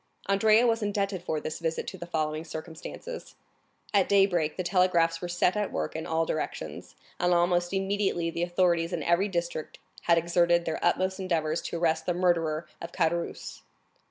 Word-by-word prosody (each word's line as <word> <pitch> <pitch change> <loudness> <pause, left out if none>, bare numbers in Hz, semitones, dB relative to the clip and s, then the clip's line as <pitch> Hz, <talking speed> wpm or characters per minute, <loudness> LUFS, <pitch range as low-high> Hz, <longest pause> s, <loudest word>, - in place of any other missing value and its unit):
Andrea 215 +4 +4
was 230 -1 +2
indebted 200 -2 -1
for 160 -3 -2
this 155 - -5
visit 165 -1 -2
to - - -6
the 170 - -7
following 155 -2 -1
circumstances. 165 - -8 0.6
At 200 -2 +3
daybreak, 185 -6 +3
the 185 - -1
telegraphs 175 -2 +2
were 175 - -3
set 175 +2 +1
at 210 -1 -1
work 75 - -3
in 160 - -4
all 165 -1 +1
directions, 80 - -4 0.2
and 180 0 +2
almost 175 0 +2
immediately 195 -3 0
the 170 - -4
authorities 175 -1 +1
in 165 -3 -2
every 170 +5 +2
district 170 -4 -3 0.3
had 170 -1 +5
exerted 170 0 +3
their 160 - -3
utmost 185 +2 +1
endeavors 165 -4 0
to - - -4
arrest 160 -1 0
the 175 - +1
murderer 170 -3 +1 0.2
of 170 - -6
Caderousse. 170 -1 -2
175 Hz, 170 wpm, -28 LUFS, 165-185 Hz, 0.6 s, had